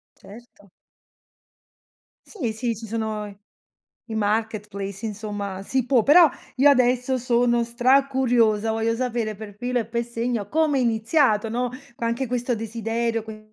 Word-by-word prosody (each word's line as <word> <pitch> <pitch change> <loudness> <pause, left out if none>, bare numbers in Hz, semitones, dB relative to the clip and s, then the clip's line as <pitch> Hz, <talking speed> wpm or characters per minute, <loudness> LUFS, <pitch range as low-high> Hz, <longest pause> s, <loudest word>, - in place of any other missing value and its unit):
Certo. 205 -2 -16 1.6
Sì, 255 - -4
sì, 230 0 -2
ci 225 - -8
sono 220 -1 -3
i 200 -1 -12 0.7
i 220 - -5
marketplace, 210 -1 -2
insomma, 205 -2 -5
si 260 +4 -1
può. 250 -4 +3
Però 320 +2 +7 0.3
io 285 +3 +6
adesso 255 0 +2
sono 240 -1 +2
stracuriosa, 245 -3 +2
voglio 225 +1 0
sapere 235 -3 -2
per 205 -1 -10
filo 245 +1 -1
e 225 - -3
per 235 +1 -2
segno 235 -3 -3
come 310 -1 +2
è - - +2
iniziato, 225 -1 +2
no, 245 +2 -1 0.3
co 235 - -5
anche 235 +3 -1
questo 245 0 -1
desiderio, 225 +1 -2
que 215 -1 -11
230 Hz, 140 wpm, -23 LUFS, 215-250 Hz, 1.6 s, Però